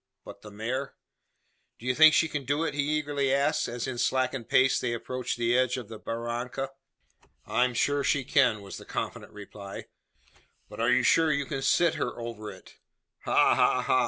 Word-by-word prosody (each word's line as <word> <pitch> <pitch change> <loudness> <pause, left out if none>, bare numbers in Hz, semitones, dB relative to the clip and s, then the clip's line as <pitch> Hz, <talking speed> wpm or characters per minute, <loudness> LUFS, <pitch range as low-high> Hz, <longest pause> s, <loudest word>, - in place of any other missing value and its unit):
But - - -11
the 105 - -11
mare? 120 +7 -4 0.8
"Do 115 - -13
you 125 - +1
think 155 +3 +7
she 165 - +3
can 150 -2 -4
do 145 +5 0
it?" 165 - -2
he 145 - 0 0.2
eagerly 145 -2 -1
asked, 140 +3 +1
as, 120 0 -4
in 125 -2 -4
slackened 130 -2 0
pace, 130 -1 +4
they 120 -1 -2
approached 125 +2 -4
the 120 0 +1
edge 130 0 +2
of 120 -4 -7
the 110 -2 -9
barranca. 120 +4 -4 0.7
"I 125 - +2
am 125 -1 -3
sure 145 +4 +1
she 140 -1 +1
can," 125 -5 +2
was 100 - -8
the - - -11
confident - - -5
reply. 100 -1 -9 0.8
"But - - -11
are 115 +2 +2
you 125 - +3
sure 160 -1 +4
you 145 -1 0
can 135 -1 -4
sit 165 +4 +3
her - - -3
over 115 -2 -6
it?" 95 -2 -14 0.5
"Ha! - - +4
ha! - - +2
ha!" - - +2
125 Hz, 195 wpm, -28 LUFS, 115-140 Hz, 0.8 s, think